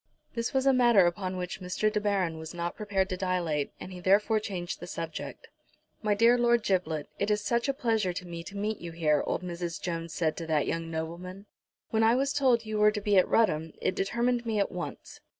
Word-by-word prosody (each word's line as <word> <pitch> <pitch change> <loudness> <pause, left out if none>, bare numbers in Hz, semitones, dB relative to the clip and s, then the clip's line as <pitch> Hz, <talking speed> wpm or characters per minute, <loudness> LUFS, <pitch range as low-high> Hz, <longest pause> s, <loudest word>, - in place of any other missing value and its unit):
This 230 0 -2
was 265 -1 +1
a 270 - +5
matter 240 -7 +5
upon 185 +1 -1
which 180 +1 -5
Mr. 200 +4 0
De 210 - 0
Baron 190 -6 0
was 160 +2 -8
not 170 0 -3
prepared 200 -3 0
to 185 - -2
dilate, 175 -6 -1
and 185 - -8
he 180 - -8
therefore 205 +4 +3
changed 185 -5 -5
the 175 - -8
subject. 165 -2 -6 0.5
"My 210 -1 +2
dear 235 +3 +5
Lord 240 -1 +3
Giblet, 165 -7 0
it 200 - 0
is 210 0 +2
such 235 +5 0
a - - +2
pleasure 225 -7 +1
to 180 +1 -6
me 170 -1 -6
to 200 - -8
meet 210 +2 -2
you 170 -1 -7
here," 150 -3 +2
old - - -1
Mrs. 170 -1 -4
Jones 165 -2 -4
said 160 -1 0
to 165 - -5
that 155 -2 +2
young 165 0 -2
nobleman. 170 +4 -5 0.5
"When 220 - +2
I 225 +2 +5
was 275 +2 +1
told 255 -5 +3
you 215 -1 -2
were 210 0 +6
to 210 0 -2
be 205 0 +1
at - - +3
Rudham, 160 -8 +2
it - - 0
determined 235 +5 0
me 225 -2 -1
at 200 - +1
once." - - -7
190 Hz, 225 wpm, -29 LUFS, 170-220 Hz, 0.5 s, were